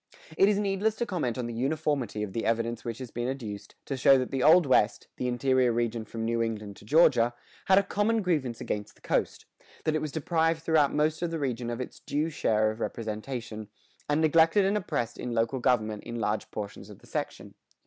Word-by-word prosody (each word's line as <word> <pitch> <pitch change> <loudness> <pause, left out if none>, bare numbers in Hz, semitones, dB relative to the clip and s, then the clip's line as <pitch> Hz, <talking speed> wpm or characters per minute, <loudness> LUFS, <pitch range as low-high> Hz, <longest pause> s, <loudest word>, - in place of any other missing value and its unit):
[120:3] - - -13
It 195 - +6
is 205 - +2
needless 205 +1 0
to 235 - -2
comment 165 - -2
on 125 - -2
the 120 - -5
uniformity 135 -3 -1
of 100 -2 -5
the 115 - -2
evidence 115 0 -1
which 115 -1 -4
has 130 -3 -8
been 120 +1 -3
adduced, 110 -7 -6
to 135 - -3
show 135 +1 +6
that 130 -1 -2
the 135 -2 -1
Old 165 +4 +6
West, 120 -5 +2
the 125 - -2
interior 125 0 +2
region 115 -1 -1
from 115 +1 -5
New 115 0 0
England 105 -3 -3
to - - -15
Georgia, 120 -4 +4 0.3
had 190 - +5
a 200 - +5
common 210 +2 0
grievance 145 -10 -1
against 105 -1 -4
the - - -26
coast; - - -1 0.4
that 155 - +1
it 155 - 0
was 155 - -3
deprived 165 +1 0
throughout 155 -4 +3
most 155 +2 0
of 175 - 0
the 165 - -3
region 125 -5 -2
of 120 0 -4
its 125 - -6
due 155 +3 -2
share 110 -7 +1
of 110 - -9
representation, 110 -1 -5 0.4
and 150 +2 +2
neglected 165 +5 +4
and 195 +2 +2
oppressed 150 - -2
in 120 -1 -4
local 115 +3 0
government 110 -4 +1
in 120 0 -5
large 105 0 -1
portions 100 -1 -7
of 105 - -11
the - - -20
section. - - -5
130 Hz, 220 wpm, -28 LUFS, 115-160 Hz, 0.4 s, It